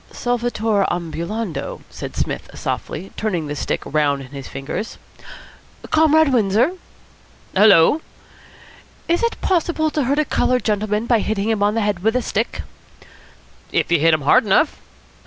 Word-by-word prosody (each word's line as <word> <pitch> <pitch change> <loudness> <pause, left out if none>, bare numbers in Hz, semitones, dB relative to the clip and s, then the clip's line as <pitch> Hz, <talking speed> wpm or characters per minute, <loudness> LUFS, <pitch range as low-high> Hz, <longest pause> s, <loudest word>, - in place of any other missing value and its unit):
"Solvitur 230 -4 0
ambulando," 175 +4 -4
said - - -7
Psmith - - -3
softly, 190 +5 -4
turning 185 -7 -2
the 145 0 -4
stick - - -2
round 145 -2 0
in 130 - -12
his 135 -1 -8
fingers. 150 +11 -5 0.9
"Comrade 315 -2 +4
Windsor!" 225 - +3 0.8
"Hullo?" 205 - +6 1.1
"Is 340 0 +1
it 465 0 -1
possible 330 -3 +1
to 295 -3 0
hurt 280 +4 +1
a 305 - +2
coloured 250 -2 +1
gentleman 210 +1 0
by 235 -2 +3
hitting 215 0 -1
him 220 -2 0
on 205 +1 +2
the 225 - +1
head 205 -3 0
with 220 +4 +1
a 250 - +1
stick?" 220 +2 -2 1.1
"If - - 0
you 170 - +4
hit 165 +1 +4
him 155 - -4
hard 235 - +4
enough." 220 +10 +2
215 Hz, 150 wpm, -20 LUFS, 175-250 Hz, 1.1 s, Hullo